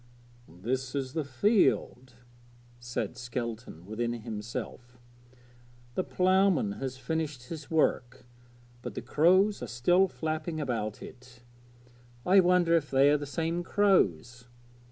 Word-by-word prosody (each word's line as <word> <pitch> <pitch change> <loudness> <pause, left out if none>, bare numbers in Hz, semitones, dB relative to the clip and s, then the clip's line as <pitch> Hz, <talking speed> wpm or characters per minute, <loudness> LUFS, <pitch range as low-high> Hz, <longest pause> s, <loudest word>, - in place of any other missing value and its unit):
'This 125 - -4
is 135 -2 -3
the 160 - -1
field,' 130 - +1 0.7
said 120 0 -4
Skelton 120 -7 -6
within 115 +3 -3
himself. 120 +2 -7 1.0
'The 185 - -1
ploughman 185 - +2
has 130 -1 -4
finished 145 -2 -4
his 160 -3 -7
work, 130 -7 0 0.6
but - - -7
the - - -5
crows 185 +6 +3
are - - -4
still 175 +11 +3
flapping 160 -1 -4
about 115 -7 -3
it. 125 -1 -14 0.8
I 190 +2 +6
wonder 180 -2 +4
if 150 -3 0
they 135 +1 +4
are 150 - +4
the 145 0 -6
same 165 +4 -2
crows! 125 - +1
135 Hz, 120 wpm, -29 LUFS, 120-165 Hz, 1.0 s, I